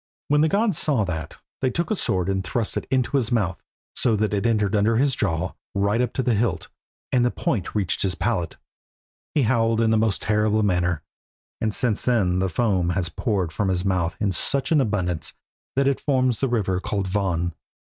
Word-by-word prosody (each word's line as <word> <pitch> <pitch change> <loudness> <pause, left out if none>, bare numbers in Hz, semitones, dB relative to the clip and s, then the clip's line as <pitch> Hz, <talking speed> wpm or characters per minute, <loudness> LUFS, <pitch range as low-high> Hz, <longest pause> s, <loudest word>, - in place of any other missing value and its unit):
When 150 0 +4
the 160 - +3
gods 205 -2 +1
saw 135 -8 +2
that 80 -4 -5 0.2
they 130 - +2
took 170 - -2
a - - +2
sword 95 - -1
and 95 -1 0
thrust 110 +4 -2
it - - -3
into 130 +1 +1
his 125 -4 -1
mouth, 95 -8 0 0.3
so 115 -3 +1
that 105 0 0
it 105 +3 +1
entered 105 -3 +1
his - - +3
under 110 +2 +2
jaw 90 - -1 0.2
right 100 +4 +2
up 125 -2 0
to 130 - -1
the 125 - +2
hilt, 110 -2 -1 0.4
and 125 -2 +3
the 125 - +3
point 105 -5 -2
reached 100 -5 0
his 95 -2 +1
palate. 105 -8 -1 0.8
He 145 - +3
howled 115 -1 +2
in 115 -1 +3
the 110 - +3
most 110 -2 0
terrible 105 0 +2
manner, 90 -5 +1 0.6
and 110 - +1
since 110 0 0
then 95 -8 +2
the 95 0 +1
foam 95 -3 +1
has 90 -1 -1
poured 95 -2 -1
from 100 +4 -1
his 90 0 0
mouth 95 -3 0
in 105 -2 +1
such 135 - +1
abundance 100 - 0 0.4
that 135 +1 +2
it 140 - +1
forms 130 -4 +1
the 135 - +1
river 95 -6 0
called 100 0 -2
Von. 90 -3 -1
105 Hz, 200 wpm, -24 LUFS, 95-120 Hz, 0.8 s, When